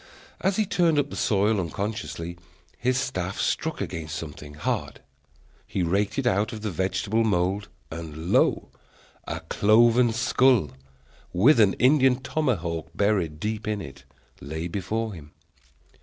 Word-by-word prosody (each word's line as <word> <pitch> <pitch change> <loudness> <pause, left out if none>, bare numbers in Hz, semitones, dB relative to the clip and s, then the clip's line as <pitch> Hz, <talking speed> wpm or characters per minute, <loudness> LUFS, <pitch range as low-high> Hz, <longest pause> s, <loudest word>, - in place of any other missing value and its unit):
As 190 +1 +1
he 215 - +2
turned 170 -5 +2
up 145 0 +1
the - - -6
soil 105 0 +2
unconsciously, 90 -1 -4 0.4
his 125 +1 0
staff 100 -9 -2
struck - - -1
against 80 -1 -4
something 75 -2 -8
hard. 75 - -3 0.7
He 95 - -1
raked 100 - 0
it 135 - 0
out 105 -1 +1
of 110 -2 -7
the 105 - -2
vegetable 95 +5 0
mould, 100 -1 0 0.2
and 80 0 -6
lo! - - +3 0.6
a - - -4
cloven 115 +3 +4
skull, 120 - +3 0.6
with 115 +9 +5
an 100 -3 +5
Indian 130 0 +4
tomahawk 95 - -1
buried 95 -7 +1
deep 105 +3 -3
in 105 -1 -1
it, - - -9 0.4
lay 80 +4 -5
before 105 +5 -3
him. 75 -4 -12
105 Hz, 140 wpm, -25 LUFS, 85-120 Hz, 0.7 s, with